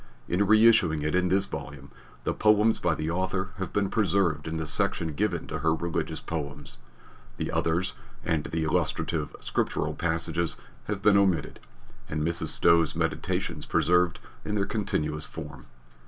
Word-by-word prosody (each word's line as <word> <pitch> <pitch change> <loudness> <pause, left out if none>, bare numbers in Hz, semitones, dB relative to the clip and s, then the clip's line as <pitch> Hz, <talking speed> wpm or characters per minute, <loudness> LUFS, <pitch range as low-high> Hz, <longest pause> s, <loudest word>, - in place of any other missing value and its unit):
In 90 +3 0
reissuing 110 -8 +5
it 75 - -1
in 90 0 +2
this 95 +1 +2
volume, 70 -6 -8 0.3
the - - 0
poems 105 +1 +3
by 85 -2 +1
the 75 +2 -2
author 95 +2 -1
have 95 - -4
been 100 -1 +1
preserved 95 -8 +1
in 80 0 -3
the 80 - -2
section 80 +1 0
given 70 - -1
to - - -4
her 80 +2 +2
Religious 85 +1 -3
Poems; 75 -5 -6 0.6
the - - -3
others 90 +4 0 0.3
and 80 -3 0
the 80 0 -2
illustrative 80 0 -1
scriptural - - -1
passages 85 0 -1 0.3
have 100 -2 -4
been 105 -1 +6
omitted 95 -7 +1 0.5
and 75 0 -2
Mrs. 85 +1 -1
Stowe's 85 -2 +4
Meditations - - -2
preserved 85 +1 +2 0.2
in 105 - -3
their 100 -2 +1
continuous 75 -8 -2
form. - - -9
85 Hz, 155 wpm, -27 LUFS, 80-95 Hz, 0.6 s, been